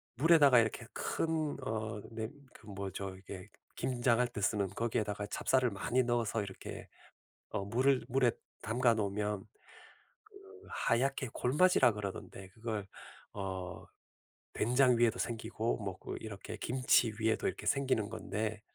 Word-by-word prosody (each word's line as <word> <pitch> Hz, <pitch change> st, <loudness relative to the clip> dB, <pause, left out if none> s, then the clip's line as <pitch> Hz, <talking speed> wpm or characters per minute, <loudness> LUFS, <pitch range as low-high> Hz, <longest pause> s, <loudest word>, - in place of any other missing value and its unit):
물에다가 145 Hz, -2 st, +7 dB
이렇게 110 Hz, -1 st, 0 dB
큰 160 Hz, -2 st, -1 dB
어 110 Hz, -1 st, -3 dB
네 110 Hz, 0 st, -4 dB, 0.2 s
그 110 Hz, -, -16 dB
뭐죠 95 Hz, -1 st, -5 dB
이게 95 Hz, +1 st, -9 dB, 0.3 s
김장할 125 Hz, -1 st, +2 dB
때 115 Hz, -, -6 dB
쓰는 100 Hz, 0 st, +2 dB
거기에다가 105 Hz, -1 st, -1 dB
찹쌀을 130 Hz, +4 st, +2 dB
많이 120 Hz, +6 st, +1 dB
넣어서 120 Hz, -2 st, 0 dB
이렇게 95 Hz, -2 st, -7 dB, 0.6 s
어 100 Hz, -2 st, -2 dB
물을 130 Hz, +4 st, +2 dB
물에 125 Hz, -1 st, +3 dB, 0.3 s
담가 120 Hz, +2 st, +3 dB
놓으면 105 Hz, -1 st, -1 dB, 0.8 s
그 425 Hz, -1 st, -22 dB, 0.3 s
하얗게 130 Hz, +1 st, +1 dB
골마지라 150 Hz, 0 st, +4 dB
그러던데 100 Hz, -2 st, -6 dB
그걸 110 Hz, -1 st, -4 dB, 0.5 s
어 95 Hz, -2 st, -5 dB, 0.7 s
된장 125 Hz, +1 st, +4 dB
위에도 120 Hz, -1 st, +3 dB
생기고 115 Hz, 0 st, -1 dB
뭐 95 Hz, -4 st, -5 dB
그 -, -, -6 dB
이렇게 110 Hz, 0 st, -7 dB
김치 125 Hz, 0 st, +3 dB
위에도 110 Hz, 0 st, +1 dB
이렇게 -, -, -4 dB
생기는 130 Hz, -6 st, +1 dB
건데 110 Hz, 0 st, -3 dB
110 Hz, 280 characters per minute, -33 LUFS, 105-125 Hz, 0.8 s, 물에다가